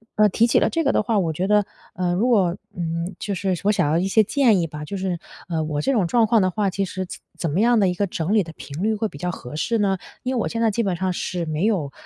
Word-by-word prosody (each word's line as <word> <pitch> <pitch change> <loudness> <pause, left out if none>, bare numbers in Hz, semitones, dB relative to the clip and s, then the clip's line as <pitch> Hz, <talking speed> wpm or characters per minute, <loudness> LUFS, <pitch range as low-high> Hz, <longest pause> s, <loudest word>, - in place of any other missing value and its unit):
呃， 210 0 +5
提 225 +4 +3
起 235 - +3
了 - - +2
这 330 - 0
个 275 - +3
的 - - +2
话， 215 +1 0
我 175 -5 +1
觉 180 +5 -1
得， 210 0 +3 0.3
呃， 180 -1 -1
如 215 +7 +1
果， 195 -7 +3 0.2
嗯， 170 +1 -3
就 205 - -3
是 190 0 -1
我 205 - +4
想 170 -8 +1
要 155 - +2
一 180 +3 +1
些 215 +3 +4
建 230 -3 +3
议 165 - 0
吧。 150 -1 -7
就 195 - -5
是， 185 -2 -2 0.3
呃， 165 -3 -1
我 150 -1 -2
这 275 - +1
种 220 -8 +2
状 230 +5 +3
况 225 -1 +4
的 185 0 +2
话， 205 +1 0
其 195 +2 -1
实 185 0 -4
怎 180 - -9 0.2
怎 165 - -2
么 165 - 0
样 235 +1 +4
的 195 - +4
一 180 - +1
个 200 - +1
整 175 +1 -2
理 215 -2 +4
的 165 -1 -10
频 150 +1 -8
率 220 +1 +2
会 220 +1 -1
比 145 - -11
较 180 +4 -2
合 125 -4 -8
适 230 +9 0
呢？ 195 -2 +2 0.3
因 260 0 -1
为 - - +1
我 - - -1
现 230 - -3
在 225 - +4
基 230 +3 0
本 190 -4 0
上 185 +2 -1
是 175 -1 -3
没 155 +3 -1
有， 180 -11 0
190 Hz, 330 characters per minute, -22 LUFS, 170-215 Hz, 0.3 s, 呃